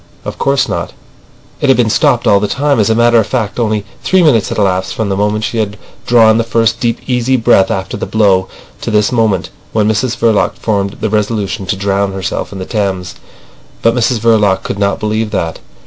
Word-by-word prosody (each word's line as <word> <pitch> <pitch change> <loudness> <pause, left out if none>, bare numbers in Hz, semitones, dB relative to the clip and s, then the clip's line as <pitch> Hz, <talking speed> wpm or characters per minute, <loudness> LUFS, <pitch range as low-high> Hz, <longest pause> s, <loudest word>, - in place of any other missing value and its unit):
Of - - -6
course 135 -1 +1
not. - - -4 0.7
It 145 - 0
had 130 - +5
been 115 -3 +2
stopped 140 -3 +2
all 100 - +4
the 105 - -1
time. 140 +2 0
As 105 - +2
a 110 - +2
matter 120 0 +4
of 110 - 0
fact, 120 -3 -2
only 110 -3 -1 0.2
three 185 -1 +3
minutes 120 -10 +3
had - - -4
elapsed 95 -2 0
from 110 -2 -2
the 95 - 0
moment 105 +2 -1
she 115 +1 -2
had 105 -1 -2 0.3
drawn 115 -2 +5
the - - +2
first 115 0 0
deep, 115 -1 0
easy 125 0 +1
breath 95 -4 +3
after 95 0 -3
the - - -4
blow, 100 -4 +2 0.3
to - - -4
this 105 +1 +2
moment 110 -6 0 0.2
when 105 -1 +2
Mrs 115 +3 0
Verloc 115 -3 +1
formed 100 -2 -2
the 110 - 0
resolution 105 -2 -2
to 95 - 0
drown 100 0 -1
herself 95 -3 -4
in 100 - -7
the 95 - -5
Thames. 95 -4 -2 0.7
But 115 - +4
Mrs 120 0 +1
Verloc 105 -4 +2
could 100 - -4
not 100 -1 0
believe 110 +1 -1
that. 80 -5 -3
110 Hz, 210 wpm, -13 LUFS, 100-115 Hz, 0.7 s, had